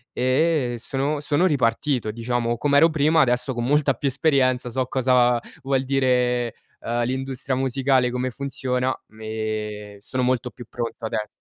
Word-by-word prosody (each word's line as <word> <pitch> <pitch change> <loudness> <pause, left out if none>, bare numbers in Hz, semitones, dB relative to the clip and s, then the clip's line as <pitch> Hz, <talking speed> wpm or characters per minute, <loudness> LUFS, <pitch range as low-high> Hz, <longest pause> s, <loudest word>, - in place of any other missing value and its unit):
e 130 0 +1
sono 140 +5 -2
sono 150 +5 +2
ripartito 125 -4 0
diciamo, 120 +1 -1
com'ero 145 +4 +5
prima, 155 +1 +3
adesso 125 +1 +1
con 120 0 -2
molta 145 0 +3
più 140 +3 -1
esperienza 130 -3 +1
so 130 +2 -1
cosa 125 -1 +3 0.2
vuol 135 -1 +1
dire, 125 -3 +1 0.3
ehm, 120 +1 -1
l'industria 130 +1 -3
musicale, 130 -1 +1
come 125 +1 -1
funziona 130 -1 -2
m 110 - -19
ehm, 105 -1 -4
sono 130 +4 -3
molto 125 -1 0
più 120 - -11
pronto 115 -1 -5
ades 110 -1 -2
130 Hz, 145 wpm, -23 LUFS, 120-135 Hz, 0.3 s, com'ero